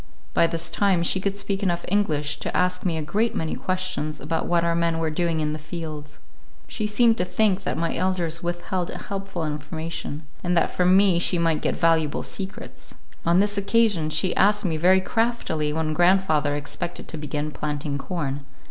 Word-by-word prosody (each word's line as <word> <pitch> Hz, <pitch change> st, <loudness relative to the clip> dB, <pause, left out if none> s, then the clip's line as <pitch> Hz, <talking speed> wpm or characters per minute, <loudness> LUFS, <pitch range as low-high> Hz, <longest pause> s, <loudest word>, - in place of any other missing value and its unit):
By 165 Hz, -, +4 dB
this 165 Hz, 0 st, -2 dB
time 190 Hz, -4 st, +2 dB
she 190 Hz, -, +2 dB
could 200 Hz, 0 st, -1 dB
speak 200 Hz, 0 st, -2 dB
enough 175 Hz, -3 st, 0 dB
English 155 Hz, -7 st, 0 dB
to -, -, -2 dB
ask 180 Hz, 0 st, +1 dB
me 170 Hz, -3 st, 0 dB
a 155 Hz, -, -2 dB
great 210 Hz, +9 st, 0 dB
many 160 Hz, -1 st, -2 dB
questions 185 Hz, -5 st, -2 dB
about 160 Hz, +4 st, -2 dB
what 170 Hz, -1 st, +2 dB
our 170 Hz, 0 st, +2 dB
men 170 Hz, -1 st, +1 dB
were 160 Hz, -1 st, -1 dB
doing 165 Hz, 0 st, 0 dB
in 150 Hz, 0 st, -1 dB
the 155 Hz, -, -5 dB
fields. 150 Hz, -2 st, -7 dB, 0.5 s
She 215 Hz, -3 st, -2 dB
seemed 225 Hz, +2 st, +3 dB
to -, -, +3 dB
think 190 Hz, +1 st, +1 dB
that -, -, -1 dB
my 165 Hz, 0 st, -1 dB
elders 175 Hz, -2 st, -1 dB
withheld 175 Hz, +1 st, -2 dB
helpful 195 Hz, -4 st, -4 dB
information, 155 Hz, +1 st, -5 dB, 0.2 s
and 175 Hz, -1 st, +1 dB
that 165 Hz, -, +2 dB
from 180 Hz, +1 st, +4 dB
me 195 Hz, -3 st, +4 dB
she 175 Hz, +1 st, +3 dB
might 165 Hz, -2 st, +1 dB
get -, -, -1 dB
valuable 160 Hz, -3 st, +2 dB
secrets. 195 Hz, 0 st, -7 dB, 0.3 s
On 170 Hz, +2 st, +5 dB
this 205 Hz, 0 st, +2 dB
occasion 200 Hz, -6 st, +2 dB
she 160 Hz, +4 st, +1 dB
asked 205 Hz, +1 st, +3 dB
me 165 Hz, -3 st, 0 dB
very 185 Hz, +4 st, +4 dB
craftily 205 Hz, -9 st, 0 dB
when 155 Hz, 0 st, -1 dB
grandfather 175 Hz, -4 st, +3 dB
expected 145 Hz, +3 st, -5 dB
to 160 Hz, -, -1 dB
begin 150 Hz, 0 st, -3 dB
planting 145 Hz, -1 st, -3 dB
corn. 145 Hz, -4 st, -3 dB
170 Hz, 185 wpm, -24 LUFS, 155-190 Hz, 0.5 s, On